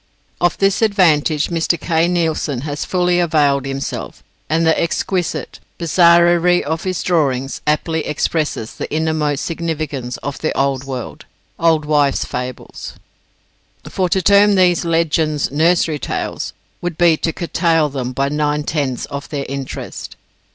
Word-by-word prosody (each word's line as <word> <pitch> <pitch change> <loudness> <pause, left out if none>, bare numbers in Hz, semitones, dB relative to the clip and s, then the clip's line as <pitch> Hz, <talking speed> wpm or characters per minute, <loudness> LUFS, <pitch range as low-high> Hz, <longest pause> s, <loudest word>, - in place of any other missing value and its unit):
Of 175 -1 +2
this 195 +2 +2
advantage 165 -8 +3
Mr. 170 0 0
Kay 165 +1 +1
Nielsen 160 -6 -1
has 145 0 -4
fully 180 -1 +1
availed 145 -5 +2
himself: 135 0 -5 0.3
and 165 +1 +2
the 160 - +3
exquisite 175 +1 -2 0.2
bizarrerie 170 +1 +4
of 160 +4 -3
his 185 -2 -2
drawings 135 -6 0
aptly 160 +1 0
expresses 150 -6 -2
the - - -6
innermost 155 -2 0
significance 155 -7 -3
of 140 0 -4
the 155 - -2
old 135 -1 0
world, 130 -3 -6 0.3
old 160 -2 +2
wives' 145 -2 +2
fables. 125 0 -6 0.9
For 185 -2 -1
to 190 +1 +1
term 200 +2 +5
these 180 -2 +3
legends, 160 -3 0
Nursery 160 0 +2
Tales, - - -4 0.3
would 175 -2 -4
be 170 -2 +5
to 165 - -1
curtail 165 -2 +1
them, 130 -3 -4
by 135 +2 0
nine 150 0 0
tenths, 140 -5 -2
of 140 0 -7
their 140 -2 -3
interest. 135 -1 -6
160 Hz, 135 wpm, -18 LUFS, 145-170 Hz, 0.9 s, term